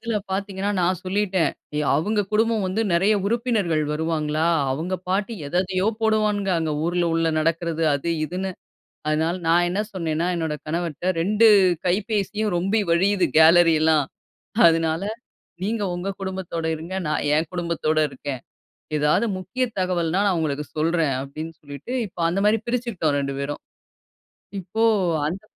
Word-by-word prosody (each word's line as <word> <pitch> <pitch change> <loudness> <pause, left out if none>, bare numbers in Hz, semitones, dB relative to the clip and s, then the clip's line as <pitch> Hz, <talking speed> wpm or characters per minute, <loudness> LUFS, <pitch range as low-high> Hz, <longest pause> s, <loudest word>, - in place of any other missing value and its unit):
அதில 230 -2 -2
பார்த்தீங்கன்னா 195 +1 -2
நான் 180 0 +1
சொல்லிட்டேன். 190 -2 +1 0.4
அவங்க 205 +9 +1
குடும்பம் 225 0 +2
வந்து 205 +5 0
நெறைய 195 +5 +3
உறுப்பினர்கள் 215 -9 0
வருவாங்களா, 155 0 -1 0.3
அவங்க 165 +7 -3
பாட்டி 200 +4 0
எத 175 +5 -1
எதையோ 185 +1 -1 0.2
போடுவான்ங்க 210 -2 +1
அங்க 160 -2 -1
ஊர்ல 175 0 +1
உள்ள 165 0 +2
நடக்கிறது 165 0 -1
அது 140 +4 -2
இதுன்னு. 185 +4 -3 0.6
அதனால 160 +3 +1
நான் 175 +1 +4
என்ன 190 +4 -2
சொன்னேன்ன்னா 165 -1 -1
என்னுடைய 160 -3 -2
கணவர்ட்ட 170 +2 -2
2 215 +5 +4 0.4
கைபேசியும் 210 +1 0
ரொம்பி 195 +5 +1
வழியிது 185 +2 +3
கேலரி 165 +1 +7
எல்லாம். 155 -3 +3 0.6
அதனால 165 +2 +1 0.6
"நீங்க 215 +1 -1
உங்க 180 +3 -3
குடும்பத்தோட 185 -4 -4
இருங்க. 165 +4 -8
நான் 150 - -1
என் 155 0 0
குடும்பத்தோட 170 -3 0
இருக்கேன். 135 -1 -6 0.6
ஏதாவது 150 +9 +2
முக்கிய 255 +8 -3 0.2
தகவல்ன்னா 180 0 0
நான் 185 -3 +1
உங்களுக்கு 150 -1 -2
சொல்றேன்." 160 -3 +1
அப்டின்னு 155 +4 -7
சொல்லிட்டு 145 - -8
இப்போ 175 -2 -8
அந்த 195 +3 -1
மாரி 215 +1 +4
பிரிச்சுக்கிட்டோம் 225 -12 0
ரெண்டு 140 -1 -3
பேரும். 145 +1 -4 1.0
இப்போ 220 +5 -2 0.4
அந்த 185 +5 -4
175 Hz, 135 wpm, -23 LUFS, 160-200 Hz, 1.0 s, கேலரி